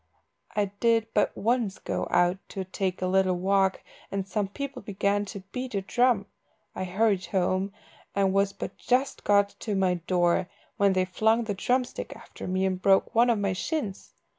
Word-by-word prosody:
I 205 -2 +1
did 230 -1 +3
but - - +1
once 230 -2 0
go - - -3
out 175 +2 +3
to 195 - -4
take 185 0 -2
a - - +2
little 185 0 +2
walk, 190 +1 +1 0.3
and 195 -1 -3
some 205 0 -1
people 275 +5 -6
began 200 0 0
to 200 0 -7
beat 250 -3 -4
a 200 - +1
drum. 240 0 +2 0.5
I 185 - -3
hurried 195 +1 +1
home, 190 +1 0 0.4
and 195 -1 +2
was 195 0 +3
but - - -7
just 260 +2 0
got 200 0 +4
to 210 -3 -2
my 190 -2 +2
door 175 +1 +1 0.3
when 200 -1 +4
they 185 0 +2
flung 220 +5 +2
the 215 -2 -2
drum 250 +6 +1
stick 245 - -7
after - - -10
me, 185 +1 +1
and 185 -1 -1
broke 195 0 +3
one 235 +2 +5
of 235 - +3
my 200 -2 0
shins. 210 - -4
195 Hz, 185 wpm, -27 LUFS, 185-220 Hz, 0.5 s, one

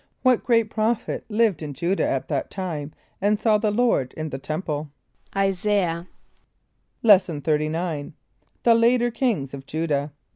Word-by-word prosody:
= - - -48
What 255 -3 +4
great 230 -2 +2
prophet 220 +1 -1
lived 215 -6 +2
in 145 -3 -6
J[=u]´dah 175 +5 -1
at 135 - 0
that 140 -3 -2
time 160 -6 -4 0.3
and 205 +1 +2
saw 215 -1 +3
the 215 0 +1
Lord 210 - +1
in 155 0 -3
the 135 - -4
temple? 155 0 -3 0.5
=[=I] 195 0 +3
[s+][=a]´iah.= 185 -3 0 1.0
Lesson 185 -8 +5
XXXIX. 155 0 -1 0.5
The 235 - +6
Later 240 +1 +3
Kings 220 - -1
of 135 0 -8
Judah. 150 -2 -1
185 Hz, 150 wpm, -24 LUFS, 155-220 Hz, 1.0 s, The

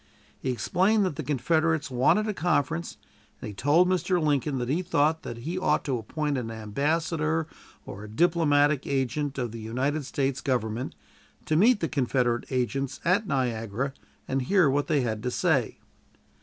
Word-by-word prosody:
He 130 - -3
explained 185 - +2
that 180 - -2
the - - -4
Confederates 155 +2 0
wanted 130 - +3
a 215 - -1
conference, 165 -1 -1 0.4
and - - -6
he - - -7
told 145 - +3
Mr. 180 0 +1
Lincoln 145 -2 0
that 120 -1 -2
he 155 +8 0
thought 160 -3 +1
that 115 - -7
he 165 +10 -4
ought 185 - +1
to 130 -5 -1
appoint 145 +5 -2
an 115 -2 -5
ambassador, 155 +8 -1 0.4
or 100 +1 -8
a - - -8
diplomatic 145 0 +2
agent, 140 +1 -1
of 120 -4 -2
the 115 - -7
United 130 +7 -1
States 135 0 -1
Government, 120 -2 -2 0.5
to 155 - 0
meet 215 +6 +4
the 165 - +1
Confederate 125 -4 0
agents 135 +1 -2
at 190 +5 +2
Niagara 125 - -1 0.3
and 135 0 0
hear 170 +1 +3
what 145 +1 0
they 150 -4 +2
had 110 -3 -2
to 125 - -2
say. - - +1
145 Hz, 170 wpm, -27 LUFS, 125-165 Hz, 0.5 s, meet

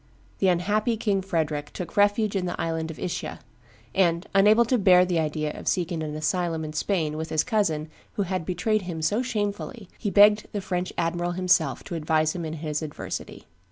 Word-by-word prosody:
The 195 - +3
unhappy 210 +6 +1
King 205 -3 0
Frederick 155 -5 -2
took 175 -2 -6
refuge 205 +1 +3
in 185 -2 0
the 175 - -4
island 165 -1 -2
of 160 - -7
Ischia; 180 -2 -4 0.5
and, 175 -1 +2
unable 210 +4 +6
to 245 +1 +1
bear 180 -2 +6
the 175 -2 0
idea 155 -1 -1
of - - -9
seeking 175 -2 0
an 150 -1 -4
asylum 165 0 -1
in 155 - -6
Spain 155 -2 -1
with 160 +1 -4
his 155 - +1
cousin 165 -9 0 0.3
who 200 - 0
had 185 -1 -2
betrayed 185 +6 0
him 170 -4 -5
so 205 +9 +2
shamefully, 210 -2 -3
he 210 - -1
begged 210 +1 +6
the 205 - -1
French 180 -2 -2
admiral 175 +1 -1
himself 175 -7 +2
to - - -8
advise 155 -1 +1
him 170 -2 -4
in 155 - -4
his 155 -1 -3
adversity. 155 -2 -6
180 Hz, 190 wpm, -26 LUFS, 160-205 Hz, 0.5 s, unable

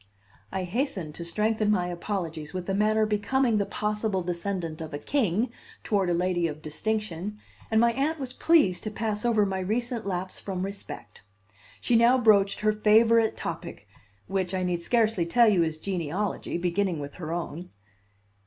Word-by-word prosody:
I 190 -1 -2
hastened 185 - -2
to 170 - -7
strengthen 215 +5 0
my 185 -4 +2
apologies 170 -3 -4
with 180 -1 -4
a 195 - 0
manner 215 +2 +3
becoming 215 +3 +1
the 200 - 0
possible 210 -2 -1
descendant 170 -2 -3
of 155 -2 -5
a - - -2
king 230 - 0 0.3
toward 195 -4 +1
a - - +2
lady 175 -1 +1
of 155 -1 -7
distinction, 210 +3 -3 0.3
and 220 - +3
my 235 +1 +5
Aunt 290 +5 0
was 260 -2 -5
pleased 245 - +3
to - - -1
pass 215 0 -2
over 225 -4 +3
my 190 -1 -2
recent 230 +3 -2
lapse 185 0 -3
from 185 -2 -4
respect. 195 - -7 0.6
She 240 - +2
now 235 +3 +6
broached 205 -5 +4
her 215 0 +3
favorite 220 +1 +4
topic, - - -6 0.4
which 190 -1 -2
I 185 - -1
need 175 -1 -1
scarcely 220 -4 +1
tell 235 +6 +5
you 195 -5 +4
is 160 -1 0
genealogy, 180 +2 -2
beginning 180 +1 0
with 145 0 -6
her 160 -1 -4
own. 175 0 -4
200 Hz, 170 wpm, -27 LUFS, 175-220 Hz, 0.6 s, now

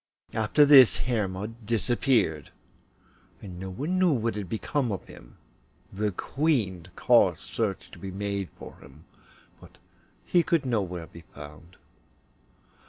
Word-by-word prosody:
After 110 +7 +3
this 135 -4 +8
Hermod 110 -1 -3
disappeared, 110 - 0 0.9
and 90 -3 -10
no 95 0 -6
one 150 - -2
knew 185 -2 +4
what 115 -3 -1
had 100 -3 -6
become 120 +4 -2
of 95 - -5
him; - - -15 0.6
the 105 +2 -1
Queen 105 - -1
caused 95 -9 +3
search 105 -4 -4
to - - -13
be 95 - -7
made 100 0 -4
for - - -11
him, 70 +4 -17 0.5
but - - -17 0.5
he 175 - +3
could 165 -4 0
nowhere 95 -8 -2
be 85 - -14
found. 75 +4 -12
105 Hz, 130 wpm, -27 LUFS, 90-125 Hz, 0.9 s, this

